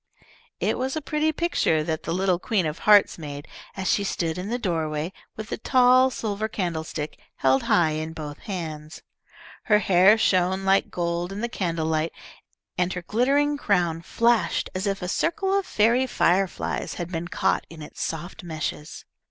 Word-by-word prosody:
It -, -, 0 dB
was 265 Hz, +2 st, -2 dB
a -, -, 0 dB
pretty 305 Hz, +1 st, 0 dB
picture 310 Hz, -, +1 dB
that 160 Hz, 0 st, -2 dB
the 165 Hz, -, -4 dB
little 185 Hz, 0 st, +1 dB
"Queen 200 Hz, -4 st, 0 dB
of 155 Hz, +1 st, -3 dB
Hearts" 205 Hz, -4 st, +6 dB
made, 145 Hz, -2 st, -7 dB, 0.3 s
as 190 Hz, -, -3 dB
she 200 Hz, -, +2 dB
stood 170 Hz, -3 st, -2 dB
in 190 Hz, +3 st, -5 dB
the 240 Hz, -, -1 dB
doorway, 160 Hz, -5 st, -2 dB, 0.2 s
with 215 Hz, 0 st, -7 dB
the -, -, -4 dB
tall 255 Hz, +1 st, +5 dB
silver 215 Hz, -3 st, -3 dB
candlestick 160 Hz, -7 st, -4 dB, 0.2 s
held 135 Hz, 0 st, +2 dB
high 165 Hz, -3 st, +4 dB
in 155 Hz, +1 st, -4 dB
both 150 Hz, -2 st, -7 dB
hands. 160 Hz, -6 st, -6 dB, 0.6 s
Her 210 Hz, -, +5 dB
hair 195 Hz, +1 st, +5 dB
shone 190 Hz, -2 st, +2 dB
like 195 Hz, 0 st, +3 dB
gold 175 Hz, +1 st, -2 dB
in 200 Hz, +2 st, -5 dB
the 235 Hz, -, 0 dB
candlelight, 165 Hz, -5 st, -1 dB, 0.7 s
and 180 Hz, +1 st, +1 dB
her 180 Hz, -, -5 dB
glittering 280 Hz, +8 st, +1 dB
crown 175 Hz, -, +1 dB
flashed 235 Hz, +5 st, +1 dB
as 190 Hz, +2 st, -2 dB
if 195 Hz, -1 st, -2 dB
a -, -, -2 dB
circle 385 Hz, -, 0 dB
of 395 Hz, -1 st, +1 dB
fairy 235 Hz, +5 st, +3 dB
fireflies 190 Hz, -4 st, 0 dB
had 175 Hz, 0 st, -5 dB
been 170 Hz, 0 st, -3 dB
caught -, -, 0 dB
in 160 Hz, -2 st, -10 dB
its -, -, -10 dB
soft 170 Hz, +3 st, -4 dB
meshes. 155 Hz, -2 st, -5 dB
185 Hz, 170 wpm, -25 LUFS, 160-220 Hz, 0.7 s, Hearts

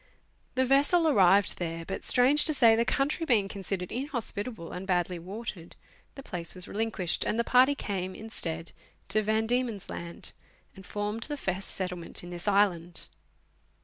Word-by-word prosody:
The 260 Hz, 0 st, +3 dB
vessels 285 Hz, +6 st, +4 dB
arrived 200 Hz, -, +4 dB
there, 165 Hz, -1 st, -3 dB
but, 195 Hz, -, -5 dB
strange 265 Hz, +4 st, +5 dB
to 310 Hz, -, 0 dB
say, 230 Hz, -4 st, +6 dB
the 230 Hz, -, +3 dB
country 290 Hz, +6 st, 0 dB
being 225 Hz, -10 st, +3 dB
considered 195 Hz, -2 st, -4 dB
inhospitable 235 Hz, -, -3 dB
and 185 Hz, +2 st, -6 dB
badly 180 Hz, -1 st, 0 dB
watered, 190 Hz, -1 st, -7 dB, 0.4 s
the 275 Hz, -, -9 dB
place 170 Hz, -6 st, -6 dB
was 180 Hz, -1 st, -6 dB
relinquished, 210 Hz, -5 st, -1 dB
and 220 Hz, -, -1 dB
the 235 Hz, -, +2 dB
party 255 Hz, +4 st, +5 dB
came, 190 Hz, -7 st, -3 dB
instead, 165 Hz, -7 st, -4 dB, 0.4 s
to 215 Hz, -, +2 dB
Van 220 Hz, +1 st, +1 dB
Diemen's 235 Hz, -4 st, -1 dB
Laud, 170 Hz, 0 st, -6 dB, 0.4 s
and 190 Hz, -2 st, -12 dB
formed 210 Hz, +2 st, -3 dB
the 295 Hz, -1 st, -4 dB
first 190 Hz, -6 st, -2 dB
settlement 180 Hz, -3 st, -4 dB
in 175 Hz, -, -8 dB
this 175 Hz, +3 st, -6 dB
island. 180 Hz, -4 st, +1 dB
205 Hz, 160 wpm, -29 LUFS, 180-245 Hz, 0.4 s, say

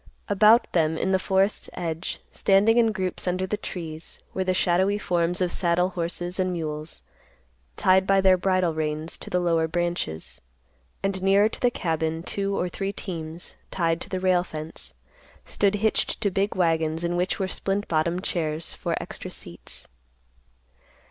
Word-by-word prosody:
About 215 Hz, +3 st, +5 dB
them 160 Hz, -2 st, +2 dB
in 190 Hz, -, 0 dB
the 190 Hz, -, +3 dB
forest's 190 Hz, +2 st, +1 dB
edge, 165 Hz, 0 st, -4 dB
standing 210 Hz, +4 st, +4 dB
in 225 Hz, -1 st, +4 dB
groups 185 Hz, -3 st, -3 dB
under 185 Hz, +1 st, 0 dB
the 200 Hz, -, -1 dB
trees, 165 Hz, -5 st, -7 dB
were 190 Hz, -, 0 dB
the 185 Hz, -, +1 dB
shadowy 190 Hz, +3 st, +2 dB
forms 175 Hz, -2 st, 0 dB
of 180 Hz, -1 st, +1 dB
saddle 180 Hz, 0 st, +2 dB
horses 175 Hz, +1 st, -3 dB
and 185 Hz, 0 st, +1 dB
mules, 155 Hz, -, -5 dB, 0.7 s
tied 190 Hz, 0 st, +4 dB
by 195 Hz, 0 st, +5 dB
their 190 Hz, -1 st, +6 dB
bridle 185 Hz, -2 st, +1 dB
reins 155 Hz, +1 st, -2 dB
to -, -, -8 dB
the 180 Hz, -, +1 dB
lower 165 Hz, -2 st, +2 dB
branches; 160 Hz, -, -3 dB, 0.6 s
and 195 Hz, -1 st, 0 dB
nearer 195 Hz, +2 st, +5 dB
to 220 Hz, -, -7 dB
the 245 Hz, -, +4 dB
cabin, 160 Hz, -5 st, -1 dB
two 200 Hz, +1 st, -2 dB
or 180 Hz, -, 0 dB
three 195 Hz, +2 st, -3 dB
teams, 170 Hz, -4 st, -6 dB
tied 165 Hz, -2 st, 0 dB
to -, -, -6 dB
the 185 Hz, -2 st, -2 dB
rail 185 Hz, -1 st, +3 dB
fence, 155 Hz, -, -7 dB, 0.5 s
stood 200 Hz, 0 st, +1 dB
hitched 220 Hz, +1 st, +1 dB
to 205 Hz, -3 st, +1 dB
big 195 Hz, +2 st, 0 dB
wagons 160 Hz, -2 st, +1 dB
in 170 Hz, 0 st, 0 dB
which 180 Hz, +1 st, 0 dB
were 190 Hz, -, -1 dB
splint 195 Hz, +2 st, -2 dB
bottom 170 Hz, +2 st, +1 dB
chairs 160 Hz, -4 st, -2 dB
for -, -, -2 dB
extra -, -, -6 dB
seats. -, -, -9 dB
180 Hz, 165 wpm, -25 LUFS, 165-195 Hz, 0.7 s, their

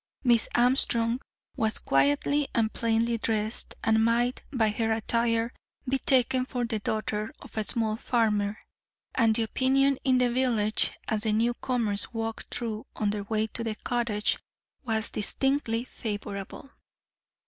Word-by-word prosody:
Miss 235 Hz, -3 st, +4 dB
Armstrong 240 Hz, -1 st, +3 dB, 0.3 s
was 220 Hz, 0 st, 0 dB
quietly 145 Hz, -, +2 dB
and 220 Hz, -1 st, +1 dB
plainly 230 Hz, 0 st, +1 dB
dressed, 220 Hz, 0 st, -1 dB
and 220 Hz, 0 st, +3 dB
might, 240 Hz, +2 st, +1 dB
by 230 Hz, -6 st, +2 dB
her 225 Hz, +1 st, -1 dB
attire, 230 Hz, +1 st, 0 dB, 0.3 s
be 265 Hz, +1 st, +1 dB
taken 255 Hz, -1 st, +3 dB
for 250 Hz, -1 st, -2 dB
the 225 Hz, -2 st, -2 dB
daughter 215 Hz, 0 st, -2 dB
of -, -, -14 dB
a 220 Hz, -, 0 dB
small 220 Hz, 0 st, +1 dB
farmer, 215 Hz, -4 st, +1 dB, 0.6 s
and 225 Hz, -3 st, +3 dB
the 230 Hz, -, +1 dB
opinion 270 Hz, +4 st, +2 dB
in 260 Hz, -1 st, +3 dB
the 250 Hz, -1 st, +2 dB
village, 235 Hz, -4 st, +2 dB, 0.2 s
as 215 Hz, -1 st, 0 dB
the 220 Hz, -1 st, +1 dB
newcomers 230 Hz, -2 st, 0 dB
walked 225 Hz, 0 st, -4 dB
through 225 Hz, -3 st, -3 dB
on 210 Hz, -1 st, 0 dB
their 205 Hz, -1 st, -4 dB
way 215 Hz, +1 st, 0 dB
to 225 Hz, +1 st, -4 dB
the 220 Hz, -2 st, -2 dB
cottage, 230 Hz, -2 st, -1 dB, 0.4 s
was 220 Hz, -3 st, 0 dB
distinctly 235 Hz, +1 st, 0 dB
favourable. 205 Hz, +2 st, -6 dB
225 Hz, 140 wpm, -27 LUFS, 215-245 Hz, 0.6 s, Miss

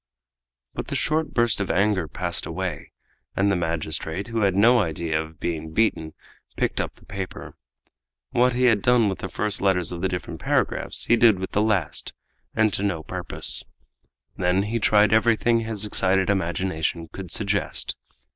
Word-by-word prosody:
But -, -, -5 dB
the -, -, -4 dB
short 155 Hz, -1 st, 0 dB
burst 120 Hz, -3 st, +3 dB
of 100 Hz, -, -2 dB
anger 100 Hz, -3 st, +1 dB
passed -, -, -1 dB
away, -, -, -4 dB, 0.4 s
and 100 Hz, +1 st, +2 dB
the -, -, +2 dB
magistrate, 80 Hz, +3 st, -2 dB
who 115 Hz, -1 st, -1 dB
had 100 Hz, -2 st, +2 dB
no 120 Hz, +5 st, +5 dB
idea 80 Hz, -4 st, -1 dB
of 80 Hz, 0 st, -11 dB
being 80 Hz, -2 st, -4 dB
beaten, 80 Hz, -7 st, 0 dB, 0.4 s
picked -, -, 0 dB
up -, -, -5 dB
the -, -, -21 dB
paper. 95 Hz, -2 st, -7 dB, 0.8 s
What 125 Hz, +1 st, +3 dB
he 125 Hz, +1 st, 0 dB
had 115 Hz, -5 st, +4 dB
done 120 Hz, -3 st, +4 dB
with 95 Hz, -, -4 dB
the 95 Hz, -, -5 dB
first 105 Hz, -1 st, -2 dB
letters 95 Hz, -3 st, +2 dB
of 85 Hz, -1 st, -5 dB
the 95 Hz, -, +1 dB
different 90 Hz, -1 st, -5 dB
paragraphs -, -, 0 dB
he 120 Hz, -, +4 dB
did 115 Hz, -4 st, +5 dB
with 95 Hz, +1 st, -5 dB
the 105 Hz, -, +1 dB
last 105 Hz, -4 st, -1 dB, 0.4 s
and 110 Hz, -2 st, +3 dB
to -, -, +2 dB
no 95 Hz, -6 st, -1 dB
purpose. -, -, -1 dB, 0.7 s
Then 90 Hz, +2 st, +1 dB
he 115 Hz, +3 st, -2 dB
tried 105 Hz, -1 st, +4 dB
everything 115 Hz, +1 st, +3 dB
his 110 Hz, -2 st, -1 dB
excited 95 Hz, -1 st, +2 dB
imagination 85 Hz, -3 st, -1 dB
could 95 Hz, +1 st, -9 dB
suggest. 100 Hz, +1 st, -1 dB
100 Hz, 170 wpm, -24 LUFS, 90-110 Hz, 0.8 s, no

